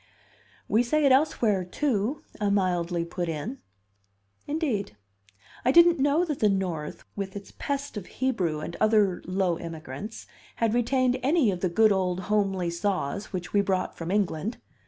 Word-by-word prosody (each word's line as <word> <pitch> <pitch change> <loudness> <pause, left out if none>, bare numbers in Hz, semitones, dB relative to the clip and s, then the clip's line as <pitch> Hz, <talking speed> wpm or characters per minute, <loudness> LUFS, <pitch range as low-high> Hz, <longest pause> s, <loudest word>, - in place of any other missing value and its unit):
"We 220 - +3
say 295 +5 +1
it 275 - +5
elsewhere, 240 -8 +3
too," 235 +5 -1 0.2
I 205 -2 +1
mildly 175 -3 +1
put 175 0 -3
in. 165 - -4 0.9
"Indeed? 265 - -2 0.7
I 255 - +4
didn't 340 +1 +6
know 290 +5 +3
that 300 -5 -3
the 210 - +4
North, 180 -6 -2
with 195 -1 -4
its 200 -1 -9
pest 280 -4 -3
of 195 - -6
Hebrew 185 -13 -1
and 170 - -6
other 210 -4 +3
low 185 -2 0
immigrants, 165 - -7 0.3
had 230 -2 +1
retained 250 +1 +2
any 275 -4 +3
of 180 - -4
the 185 - 0
good 215 +5 +4
old 185 -2 0
homely 195 -4 +1
saws 185 0 -2
which 180 -3 -5
we 205 - +5
brought 190 -2 -1
from 165 0 -6
England. 200 +2 0
200 Hz, 155 wpm, -27 LUFS, 180-250 Hz, 0.9 s, didn't